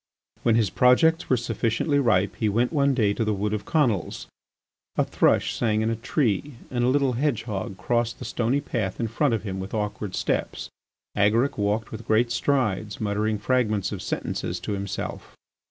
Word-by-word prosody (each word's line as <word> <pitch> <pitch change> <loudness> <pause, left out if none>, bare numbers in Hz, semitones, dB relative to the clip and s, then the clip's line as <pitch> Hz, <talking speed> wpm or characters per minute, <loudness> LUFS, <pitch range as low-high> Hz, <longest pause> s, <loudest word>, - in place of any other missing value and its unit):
When 115 - +3
his 110 -5 +2
projects 160 +7 +4
were 130 - +4
sufficiently 115 +5 0
ripe 105 -7 +2
he 110 - +1
went 120 +8 +1
one 140 -2 +3
day 105 -5 +2
to 115 - -1
the 110 -1 0
Wood 105 +2 -1
of 105 -1 -3
Conils. 120 - 0 0.7
A - - +2
thrush - - +2
sang 110 -2 +1
in 110 +1 +1
a - - 0
tree 120 - -1 0.2
and 120 -1 0
a - - +3
little 135 0 +2
hedgehog 115 -7 -2
crossed 120 +4 0
the - - -8
stony 125 +4 0
path 105 -8 -3
in 115 - 0
front 115 +2 +1
of 110 - -5
him 95 -3 -4
with 95 +3 -5
awkward 105 -2 -3
steps. - - -2 0.4
Agaric 110 +7 +2
walked 105 +2 -1
with 110 +1 -8
great 115 +2 +3
strides, 110 -5 0
muttering 105 +1 0
fragments 110 -3 0
of - - -5
sentences - - -3
to - - -4
himself. 100 -1 -5
115 Hz, 180 wpm, -25 LUFS, 105-125 Hz, 0.7 s, projects